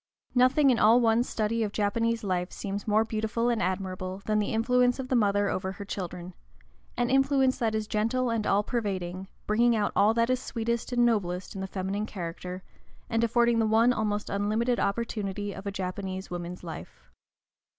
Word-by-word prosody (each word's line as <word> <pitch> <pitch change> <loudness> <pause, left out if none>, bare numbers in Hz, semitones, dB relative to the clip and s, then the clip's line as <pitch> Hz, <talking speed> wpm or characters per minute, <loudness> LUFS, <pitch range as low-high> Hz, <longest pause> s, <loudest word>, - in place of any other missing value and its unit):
Nothing 260 +3 +4
in 240 - +1
all 225 +3 +6
one's 235 +1 +2
study 225 +1 -1
of 210 -2 -1
Japanese 225 +3 0
life 180 -2 -1
seems 200 +1 -5
more 215 +1 +3
beautiful 220 +2 -1
and 235 -2 0
admirable 185 +1 -3
than 215 0 +1
the 210 - -1
influence 245 +2 +2
of 260 -1 -5
the 260 - +2
mother 205 -3 +2
over 190 0 -2
her 200 - -8
children, 180 -2 -6 0.6
an 240 +1 +1
influence 270 -1 +3
that 225 -2 0
is 215 0 -1
gentle 230 +4 0
and 225 -2 -1
all 200 +1 +3
pervading, 190 -5 -3 0.2
bringing 235 +2 +3
out 210 -2 0
all 215 +2 +4
that 230 +1 +2
is 255 - +1
sweetest 235 0 -3
and 240 -1 +3
noblest 185 -6 -1
in 195 - -6
the 190 - -3
feminine 195 +3 -3
character, 180 0 -6 0.5
and 225 0 +1
affording 235 0 +3
the 220 - +2
one 225 +3 +4
almost 210 -2 -1
unlimited 215 +5 0
opportunity 205 -2 -2
of 195 +2 -8
a - - -1
Japanese 190 0 -5
woman's 175 0 -6
life. 110 - -10
215 Hz, 180 wpm, -28 LUFS, 195-235 Hz, 0.6 s, all